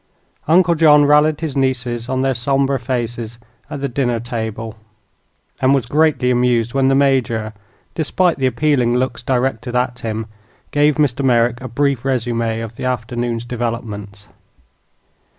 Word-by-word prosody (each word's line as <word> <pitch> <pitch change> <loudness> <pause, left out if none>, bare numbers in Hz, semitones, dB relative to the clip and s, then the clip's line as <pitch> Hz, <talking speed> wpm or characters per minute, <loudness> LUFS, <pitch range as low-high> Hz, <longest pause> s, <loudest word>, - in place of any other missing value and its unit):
Uncle 170 +2 +4
John 150 -2 +5
rallied 150 +1 +3
his 155 -4 -3
nieces 125 -3 -1
on 130 0 0
their 135 0 +1
somber 135 +2 0
faces 120 -2 -4 0.3
at 140 - -6
the 140 - 0
dinner 120 -2 -1
table, 115 -2 -5 0.9
and 135 +1 +4
was 130 -4 0
greatly 145 -1 +2
amused 120 -2 +1
when 135 -1 +2
the 135 - +3
Major, 120 -6 +1 0.4
despite 170 +1 0
the 130 - +2
appealing 130 -3 +1
looks 125 -2 -1
directed 125 -1 -1
at 125 0 -1
him, 110 0 -4 0.5
gave 145 0 +3
Mr. 140 -3 0
Merrick 120 -1 +2
a 130 - -5
brief 135 +1 0
resume 115 -3 -1
of 115 0 -8
the - - -5
afternoon's 120 -1 -2
developments. 110 -4 -5
125 Hz, 145 wpm, -18 LUFS, 115-140 Hz, 0.9 s, John